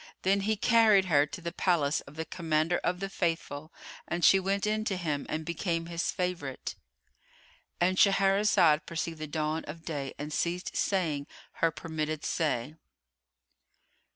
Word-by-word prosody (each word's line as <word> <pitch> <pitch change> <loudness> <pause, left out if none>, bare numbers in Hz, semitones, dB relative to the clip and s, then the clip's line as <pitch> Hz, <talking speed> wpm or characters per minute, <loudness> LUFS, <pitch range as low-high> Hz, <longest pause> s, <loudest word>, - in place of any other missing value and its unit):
Then 195 +2 +3
he 215 +2 0
carried 220 -3 +5
her 150 -4 +3
to 160 - -8
the 170 0 -4
palace 160 -6 +1
of 140 - -13
the 160 +1 -4
Commander 160 0 0
of 180 0 -1
the 195 - -1
Faithful, 165 -4 -3 0.4
and 175 0 0
she 195 - +7
went 195 +2 0
in 215 +1 0
to 195 - -1
him 150 -5 -2
and 155 0 -3
became 170 0 -2
his 170 0 -2
favourite.——And 175 - -5
Shahrazad 195 -6 +4
perceived 165 -1 -4
the 155 - -4
dawn 155 +1 -2
of 165 +2 -9
day 140 -5 -4
and 150 +1 -5
ceased 175 +3 -2
saying 155 -7 0 0.3
her 165 - +5
permitted 155 -1 -4
say. 145 -3 -1
165 Hz, 150 wpm, -29 LUFS, 155-185 Hz, 0.4 s, she